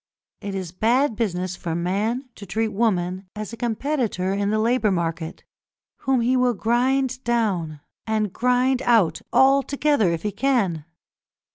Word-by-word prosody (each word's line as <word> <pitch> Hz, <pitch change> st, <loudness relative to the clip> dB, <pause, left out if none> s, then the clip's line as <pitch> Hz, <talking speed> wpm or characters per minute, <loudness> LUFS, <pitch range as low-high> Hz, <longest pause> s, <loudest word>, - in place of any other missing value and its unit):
It 200 Hz, -1 st, -5 dB
is 185 Hz, -3 st, -4 dB
bad 235 Hz, +7 st, +2 dB
business 185 Hz, -4 st, -2 dB
for 170 Hz, -3 st, -4 dB
man 210 Hz, +9 st, -1 dB
to 200 Hz, -, -11 dB
treat 220 Hz, +5 st, -1 dB
woman 190 Hz, -4 st, -1 dB
as 215 Hz, +2 st, -6 dB
a -, -, -4 dB
competitor 230 Hz, -5 st, -1 dB
in 200 Hz, 0 st, 0 dB
the 215 Hz, -, +1 dB
labour 230 Hz, 0 st, +2 dB
market, 165 Hz, -2 st, -3 dB, 0.5 s
whom 265 Hz, -2 st, +1 dB
he 250 Hz, +3 st, +2 dB
will 250 Hz, -2 st, +2 dB
grind 255 Hz, +4 st, +1 dB
down 190 Hz, -11 st, -1 dB, 0.3 s
and 215 Hz, -3 st, 0 dB
grind 250 Hz, +1 st, +2 dB
out 220 Hz, -11 st, +3 dB
altogether 275 Hz, -3 st, +3 dB
if 165 Hz, -1 st, -3 dB
he 210 Hz, -, -1 dB
can. 200 Hz, -, 0 dB
220 Hz, 145 wpm, -23 LUFS, 185-250 Hz, 0.5 s, out